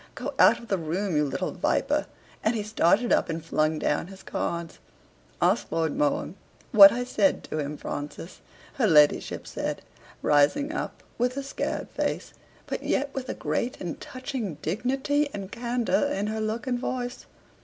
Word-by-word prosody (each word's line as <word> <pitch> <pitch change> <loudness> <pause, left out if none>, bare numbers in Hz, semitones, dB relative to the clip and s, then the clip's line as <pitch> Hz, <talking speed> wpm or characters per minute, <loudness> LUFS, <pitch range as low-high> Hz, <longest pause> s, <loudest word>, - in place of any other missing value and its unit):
"Go - - -4
out - - +7
of 235 - -12
the 195 - +1
room, 170 +3 -2
you 150 - +3
little 135 -1 -2
viper!" - - 0 0.4
and 220 +2 +2
he 215 - -1
started 215 +2 +3
up - - +2
and 165 0 -4
flung 155 -1 +1
down 150 +2 0
his 195 0 -12
cards. 170 -1 -3 0.6
"Ask - - +2
Lord 160 -2 0
Mohun 150 +2 0 0.4
what 200 -2 +10
I 245 +1 -1
said 275 +3 +1
to 155 - -4
him, 145 0 -3
Francis," 145 +6 -6 0.4
her 240 -5 +3
ladyship 150 -4 +4
said, - - -4 0.4
rising 150 - +3
up - - -5 0.2
with 250 +2 +1
a 275 - -2
scared 275 - -3
face, - - -2 0.3
but - - -4
yet 280 +1 -1
with 260 -1 -5
a - - -2
great 245 +2 -2
and 175 -3 -5
touching 255 - -5
dignity 270 +6 0
and 200 -1 -6
candor 240 +3 0
in 200 +1 -1
her 220 +1 -2
look 220 +4 -2
and 250 -2 -1
voice. 245 -1 -4
210 Hz, 170 wpm, -27 LUFS, 165-250 Hz, 0.6 s, what